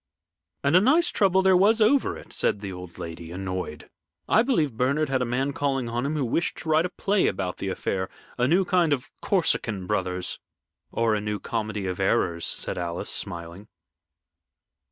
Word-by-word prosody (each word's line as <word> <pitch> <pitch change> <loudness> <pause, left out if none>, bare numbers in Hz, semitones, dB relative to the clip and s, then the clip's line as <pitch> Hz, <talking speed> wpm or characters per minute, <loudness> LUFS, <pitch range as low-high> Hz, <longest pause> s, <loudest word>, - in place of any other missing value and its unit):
"And 140 +4 +3
a 180 - +7
nice 310 - +4
trouble 190 -1 +3
there 190 -1 +5
was 205 +5 +4
over 250 +6 +3
it," - - -12
said 100 - +1
the 100 -2 -5
old 90 -1 -10
lady, 85 0 -7
annoyed. 90 -3 -5 0.4
"I 220 - +5
believe 195 - +1
Bernard 140 +5 +1
had 130 -1 +1
a - - +1
man 130 +4 -1
calling 135 -4 -1
on 120 +3 -1
him 155 - -2
who 145 -4 0
wished 165 +8 0
to 160 - -6
write 160 +3 +3
a - - -15
play 200 +1 +1
about 90 -2 -2
the - - -4
affair 95 0 -2 0.3
a 125 0 +1
new 180 +6 +3
kind 175 -4 +3
of 135 -2 -4
'Corsican 115 - 0
Brothers.'" 90 -2 -2 0.5
"Or 115 -1 +1
a 105 - 0
new 105 0 -2
'Comedy 110 -2 -3
of 90 0 -3
Errors,'" 90 -4 +1
said - - -1
Alice, 85 0 -2
smiling. 85 +4 -3
120 Hz, 185 wpm, -25 LUFS, -, 0.5 s, a